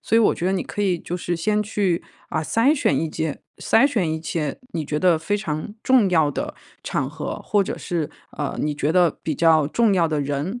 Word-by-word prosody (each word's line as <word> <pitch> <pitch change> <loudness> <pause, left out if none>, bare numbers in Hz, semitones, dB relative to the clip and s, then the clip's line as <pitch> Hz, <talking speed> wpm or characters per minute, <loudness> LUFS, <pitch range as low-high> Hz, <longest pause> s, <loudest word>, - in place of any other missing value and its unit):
所 225 - +1
以 - - +7
我 225 - +4
觉 175 - -3
得 190 - +2
你 195 - 0
可 205 - -5
以 185 -4 +1
就 175 - -6
是 175 -1 -2
先 210 +5 +1
去， 200 -5 0 0.3
啊， 160 - -1
筛选 230 - +2
一 160 - -1
件 155 -1 -3 0.2
筛选 225 - +3
一 160 - -3
些 155 -3 -3
你 160 -2 -2
觉 150 +1 -2
得 180 -1 +4
非 185 +6 -1
常 155 -1 -4
重 250 -7 +4
要 160 -4 +4
的 145 - -4 0.3
场 - - -1
合 - - -5
或 205 -1 +2
者 - - -4
是， 165 -4 -3 0.2
呃， 145 -2 -3
你 150 -1 -1
觉 145 +1 0
得 175 -2 +3
比 160 - -1
较 160 +1 +4
重 225 +2 +3
要 170 -3 +3
的 155 -2 0
人， 145 - -3
170 Hz, 250 characters per minute, -22 LUFS, 155-205 Hz, 0.3 s, 以